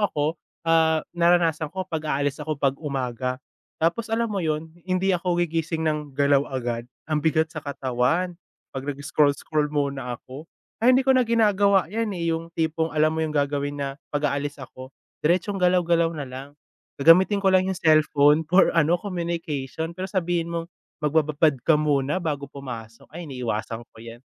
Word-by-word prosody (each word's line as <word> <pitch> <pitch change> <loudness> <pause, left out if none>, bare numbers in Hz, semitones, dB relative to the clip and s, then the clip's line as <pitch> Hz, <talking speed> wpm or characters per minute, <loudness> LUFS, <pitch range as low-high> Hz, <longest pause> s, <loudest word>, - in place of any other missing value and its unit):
ako, 145 -1 -2 0.4
ah, 160 -1 +3
naranasan 170 -2 +2
ko 190 0 -4
'pag 155 -3 -4
aalis 140 +1 -1
ako 155 -1 -3
'pag 135 -1 +1
umaga, 130 -3 -3 0.4
tapos 170 +8 0
alam 230 +1 +1
mo 200 - -1
‘yon, 160 0 -2 0.2
hindi 185 +1 +1
ako 175 0 -1
gigising 165 0 -2
ng 150 -3 -2
galaw 140 0 +3
agad, 120 -2 -3 0.2
ang 155 -1 0
bigat 160 0 +1
sa 155 - -5
katawan. 140 +6 -1 0.4
'Pag 135 - -5
nag-scroll-scroll 145 +1 +1
muna 140 -4 -2
ako, 140 +8 -12 0.3
kaya 240 - +5
hindi 265 - +3
ko 265 - +6
na 255 - +5
ginagawa 205 -5 +3
‘yan, 225 -1 -1
eh, 170 -1 0
yung 165 +1 -6
tipong 160 0 0
alam 155 +1 +2
mo 160 - -1
yung 155 -1 -3
gagawin 145 0 -1
na 140 -1 -2 0.2
‘pag 145 0 0
aalis 145 0 -4
ako, 130 0 -10 0.3
diretsong 180 +5 +1
galaw-galaw 175 -2 +3
na 145 -3 -5
lang. 130 +2 -8 0.5
Gagamitin 180 +7 +6
ko 195 - -2
lang 185 - +5
yung 185 - -3
cellphone 155 -1 +4
for 180 +4 +3
ano, 165 +1 +3
communication, 165 -4 -4
pero 185 +1 -5
sabihin 175 -3 -1
mong 170 0 -3 0.3
magbababad 155 -1 +2
ka 150 +2 +4
muna 145 0 +1
bago 145 -5 -4
pumasok, 115 -5 -9
ay 175 - -6
iniiwasan 120 -3 -4
ko - - -61
‘yan. 115 0 -10
155 Hz, 170 wpm, -24 LUFS, 140-170 Hz, 0.5 s, ko